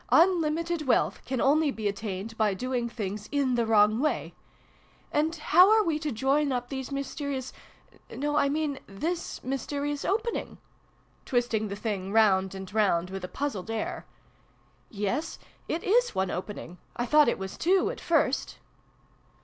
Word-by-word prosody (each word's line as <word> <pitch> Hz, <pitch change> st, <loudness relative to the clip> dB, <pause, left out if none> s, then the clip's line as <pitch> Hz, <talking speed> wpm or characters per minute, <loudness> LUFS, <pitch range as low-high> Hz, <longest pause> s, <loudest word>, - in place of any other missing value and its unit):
Unlimited 335 Hz, -2 st, +2 dB
wealth 255 Hz, -, +2 dB
can 260 Hz, -1 st, -1 dB
only 295 Hz, +4 st, +3 dB
be 220 Hz, -6 st, -2 dB
attained 200 Hz, +1 st, -4 dB
by 215 Hz, -3 st, +1 dB
doing 245 Hz, +2 st, -2 dB
things 210 Hz, -2 st, -5 dB
in 280 Hz, -3 st, +1 dB
the 235 Hz, -2 st, +1 dB
wrong 215 Hz, 0 st, +4 dB
way! 300 Hz, +3 st, -1 dB, 0.8 s
And 310 Hz, +3 st, +1 dB
how 345 Hz, +4 st, +6 dB
are 435 Hz, 0 st, +5 dB
we 320 Hz, -5 st, 0 dB
to 305 Hz, -1 st, -2 dB
join 275 Hz, +5 st, +1 dB
up 245 Hz, -1 st, -2 dB
these 265 Hz, -1 st, -5 dB
mysterious 275 Hz, -1 st, -4 dB, 0.6 s
no, 295 Hz, +2 st, -2 dB
I 280 Hz, -2 st, +3 dB
mean 295 Hz, -1 st, -1 dB
this 325 Hz, -, -4 dB
mys 265 Hz, +1 st, -3 dB
terious 290 Hz, 0 st, -2 dB
opening? 455 Hz, +4 st, -2 dB, 0.3 s
" -, -, -36 dB
(twisting 240 Hz, -4 st, 0 dB
the 200 Hz, -, -5 dB
thing 200 Hz, -3 st, -3 dB
round 195 Hz, -3 st, +3 dB
and 190 Hz, 0 st, -8 dB
round 185 Hz, -5 st, +2 dB
with 190 Hz, -1 st, -5 dB
a -, -, -3 dB
puzzled 225 Hz, -5 st, -4 dB
air.) 225 Hz, -1 st, -3 dB, 0.8 s
"Yes, 230 Hz, +10 st, -2 dB, 0.3 s
it 330 Hz, -, -2 dB
is 485 Hz, +5 st, +2 dB
one 190 Hz, -1 st, 0 dB
opening. 180 Hz, -2 st, -6 dB, 0.2 s
I 240 Hz, -, -1 dB
thought 300 Hz, +3 st, +5 dB
it -, -, -1 dB
was 190 Hz, 0 st, -6 dB
two, 370 Hz, +2 st, +2 dB
at -, -, -9 dB
first." -, -, +1 dB
260 Hz, 160 wpm, -28 LUFS, 210-300 Hz, 0.8 s, how